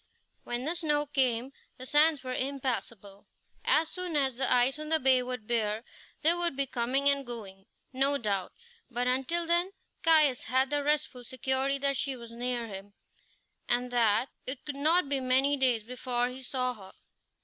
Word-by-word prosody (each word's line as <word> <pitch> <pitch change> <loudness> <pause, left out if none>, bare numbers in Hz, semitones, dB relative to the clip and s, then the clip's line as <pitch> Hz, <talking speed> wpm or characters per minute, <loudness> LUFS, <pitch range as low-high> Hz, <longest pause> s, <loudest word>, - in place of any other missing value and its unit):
When 240 +1 -3
the 320 - +1
snow 300 -3 +1
came 260 -2 0 0.2
the 255 - -9
sands 300 +1 +4
were 255 -1 -4
impassable. 240 -7 -4 0.4
As 315 +1 +4
soon 365 -2 -5
as 270 -3 +1
the 265 0 0
ice 250 +4 +3
on 305 0 -5
the 320 0 +3
bay 260 -2 +4
would 250 -3 -5
bear, 220 -1 -1 0.4
there 330 +3 +5
would 345 -4 -1
be 275 0 0
coming 260 +2 0
and 280 0 +3
going, 205 -6 -9 0.3
no 275 +2 +2
doubt; 200 -6 -2 0.4
but 245 0 -2
until 270 +7 0
then 345 +3 +1 0.3
Caius 305 -6 +4
had 260 +3 +1
the 290 0 +1
restful 285 -4 0
security 265 +2 -1
that 275 0 0
she 275 -2 -2
was 235 -2 -11
near 240 0 -2
him, 200 -1 -9 0.8
and 245 +1 +1
that 230 0 +2 0.2
it 260 0 -4
could 290 - -5
not 315 +4 +3
be 275 -1 0
many 265 +2 +3
days 250 -5 +2
before 245 0 -2
he 255 +1 -8
saw 255 0 -1
her. 195 -5 -12
260 Hz, 175 wpm, -29 LUFS, 240-285 Hz, 0.8 s, there